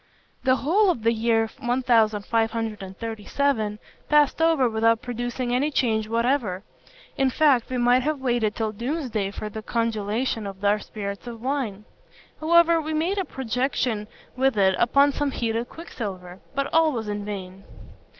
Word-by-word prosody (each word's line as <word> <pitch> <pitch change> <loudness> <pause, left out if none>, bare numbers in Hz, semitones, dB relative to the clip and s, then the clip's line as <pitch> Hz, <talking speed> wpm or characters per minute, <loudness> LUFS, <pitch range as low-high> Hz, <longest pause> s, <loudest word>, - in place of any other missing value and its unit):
"The 260 0 +5
whole 370 +10 +3
of 240 -11 -1
the 230 +1 +3
year 225 0 +2
1537 225 0 0 0.3
passed 300 +1 +4
over 325 -6 +4
without 225 0 +2
producing 245 +1 -3
any 275 +4 +2
change 220 -6 0
whatever; 230 -5 0 0.5
in 270 -1 +3
fact 270 -3 +3
we 255 - -2
might 245 +1 +4
have 300 +2 -1
waited 240 -5 0
till 220 -1 -1
doomsday 235 -3 -2
for 210 +1 -6
the 215 +1 -6
congelation 225 0 -1
of 195 +1 -7
our 205 +1 +3
spirits 200 +1 -6
of 235 -1 -7
wine. 250 -7 -2 0.5
However, 335 +1 +4
we 310 0 -3
made 350 +6 0
a 380 - -1
projection 250 -4 -2 0.3
with 260 -2 +1
it 190 -1 +4
upon 280 +4 +4
some 290 +1 -1
heated 230 -2 -2
quicksilver; 190 - -7 0.2
but 275 0 -2
all 320 -1 +4
was 225 -3 -4
in 205 0 -3
vain. 195 -2 -7
235 Hz, 150 wpm, -24 LUFS, 215-270 Hz, 0.5 s, The